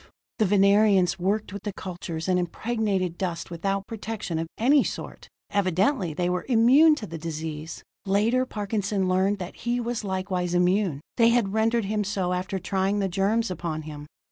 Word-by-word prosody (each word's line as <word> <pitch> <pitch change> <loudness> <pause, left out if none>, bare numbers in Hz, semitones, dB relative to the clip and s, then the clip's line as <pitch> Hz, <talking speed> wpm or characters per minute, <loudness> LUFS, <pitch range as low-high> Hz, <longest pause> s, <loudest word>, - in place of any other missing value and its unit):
The 215 - +4
Venerians 200 -2 +4
worked 195 +2 -1
with 200 - -6
the 205 - -4
cultures 175 -3 -6
and 180 -1 +2
impregnated 190 -1 -1
dust 175 -3 -3
without 195 +3 -2
protection 215 -6 -4
of 165 - -3
any 270 +5 +4
sort: - - -6 0.2
evidently 195 - +1
they 175 +3 -1
were 180 0 -2
immune 265 +7 +6
to 230 - -6
the 165 -2 -7
disease. 160 -1 -6 0.2
Later 220 +6 +2
Parkinson 205 -3 -1
learned 190 +2 +2
that 180 -2 -7
he 240 +1 -1
was 235 -2 -3
likewise 185 -2 -2
immune; 180 -4 +2 0.2
they 230 -1 +6
had 230 -5 +1
rendered 225 0 +1
him 210 +1 -1
so 190 -3 -1
after 185 +2 -2
trying 190 +2 0
the 200 -1 +1
germs 200 +4 0
upon 160 -3 -4
him. 150 -1 -8
195 Hz, 170 wpm, -25 LUFS, 180-215 Hz, 0.2 s, immune